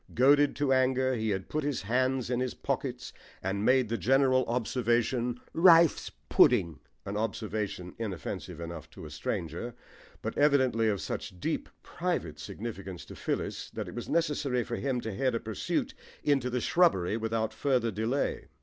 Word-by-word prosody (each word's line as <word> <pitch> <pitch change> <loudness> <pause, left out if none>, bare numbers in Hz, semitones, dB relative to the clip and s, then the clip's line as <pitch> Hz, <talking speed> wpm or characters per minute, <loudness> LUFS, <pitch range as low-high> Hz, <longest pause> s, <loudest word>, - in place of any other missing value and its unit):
Goaded 145 +3 +5
to 140 -1 +2
anger, 130 0 +2
he 110 -2 -1
had 95 -2 -2
put 155 0 -2
his 140 -6 -2
hands 130 +3 0
in 125 - +1
his 130 -1 -2
pockets - - -3 0.3
and 95 +2 -1
made 130 +1 +4
the 115 +1 -2
general 130 +4 +4
observation 120 0 0
"Rice 165 -2 +6 0.2
pudding" 85 -3 +4 0.3
an 100 - -4
observation 105 -4 -3
inoffensive 95 -7 -5
enough 85 -2 -7
to - - -11
a - - -9
stranger, 85 +9 -4 0.5
but - - -3
evidently 130 -6 +3
of 100 -3 0
such 90 - -5
deep, - - -2
private 170 - -3
significance 100 0 -6
to - - -10
Phyllis - - -3
that - - -4
it - - -8
was 120 - -6
necessary 150 -6 +1
for 120 - -4
him 130 -3 -1
to 110 -2 -4
head 130 +2 0
a - - 0
pursuit 110 -2 -2 0.3
into 135 -4 +2
the 125 0 -1
shrubbery 110 - +3
without 110 0 -1
further 125 -5 +1
delay. 110 +7 -1
120 Hz, 160 wpm, -30 LUFS, 105-130 Hz, 0.5 s, Rice